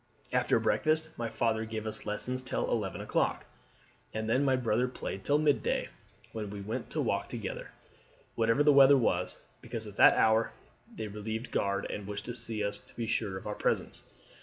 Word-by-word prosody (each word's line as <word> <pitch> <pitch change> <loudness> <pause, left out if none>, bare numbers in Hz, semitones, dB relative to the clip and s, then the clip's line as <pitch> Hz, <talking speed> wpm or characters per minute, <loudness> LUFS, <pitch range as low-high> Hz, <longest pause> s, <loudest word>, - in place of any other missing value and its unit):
After - - +3
breakfast 160 +1 +1
my 115 -1 -3
father 115 -1 0
gave 110 -1 -5
us 110 - -5
lessons 125 +5 -3
till 130 - -2
eleven 105 -5 -1
o'clock; - - 0 0.7
and 110 0 -2
then 125 +5 +3
my 135 -2 +3
brother 125 0 +1
played 95 -6 -6
till 145 - +3
midday, 150 -2 +1 0.4
when 105 -2 -4
we 100 0 -6
went 100 +3 -4
to - - -3
walk - - -1
together, - - -5 0.6
whatever 115 +5 +3
the 150 -1 +6
weather 140 0 +8
was, 120 - 0 0.2
because 110 -1 -5
at 105 -1 -10
that - - +8
hour 110 +1 +3 0.4
they 110 - -4
relieved 110 +3 -5
guard 100 0 0
and 105 -1 -5
wished 105 0 -5
to 120 - -4
see 110 -3 -4
us 100 0 -2
to - - -19
be 115 - -2
sure 105 -3 -1
of - - -9
our 105 - -2
presence. - - -1
110 Hz, 185 wpm, -31 LUFS, 105-125 Hz, 0.7 s, weather